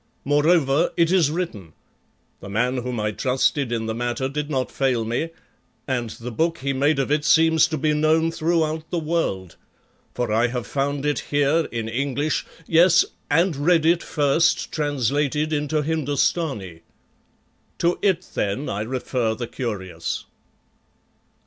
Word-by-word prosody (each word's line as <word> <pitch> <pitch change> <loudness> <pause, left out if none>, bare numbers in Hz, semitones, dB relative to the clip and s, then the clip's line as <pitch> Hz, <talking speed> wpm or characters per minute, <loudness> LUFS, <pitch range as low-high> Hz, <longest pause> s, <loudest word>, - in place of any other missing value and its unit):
Moreover 145 +1 +3
it 170 0 +3
is 180 -6 +4
written; 150 - -4 0.7
the 100 - -9
man 125 +5 0
whom 125 -1 -3
I 105 0 0
trusted 130 +2 0
in 115 -1 -1
the 110 - -2
matter 120 +3 -2
did 150 +2 -4
not 130 -4 -1
fail 130 -4 0
me, 120 +9 -2 0.6
and 125 -4 -1
the 120 +3 -7
book 165 +7 0
he 140 -1 -2
made 140 +3 +2
of 135 +1 -1
it 150 0 +2
seems 160 +1 +4
to 160 -2 -3
be 150 +1 +1
known 160 +2 +2
throughout 160 -1 -1
the 175 - -2
world, 155 - -2 0.6
for 120 -3 -1
I 115 +2 +3
have 125 -1 -4
found 140 0 -2
it 145 0 +1
here 145 +3 +2
in 115 -2 -3
English, 140 +5 -1 0.2
yes, 170 +3 +5 0.2
and 165 +3 +2
read 160 +3 +2
it 170 +1 +4
first 150 +2 +1
translated 145 +1 0
into 150 +1 0
Hindostani. 145 - -1 1.0
To 175 +1 +1
it 190 -5 +1
then 105 +8 -2
I 100 - -2
refer 120 -1 -1
the 120 - -4
curious. 95 -10 -4
145 Hz, 150 wpm, -23 LUFS, 120-160 Hz, 1.0 s, yes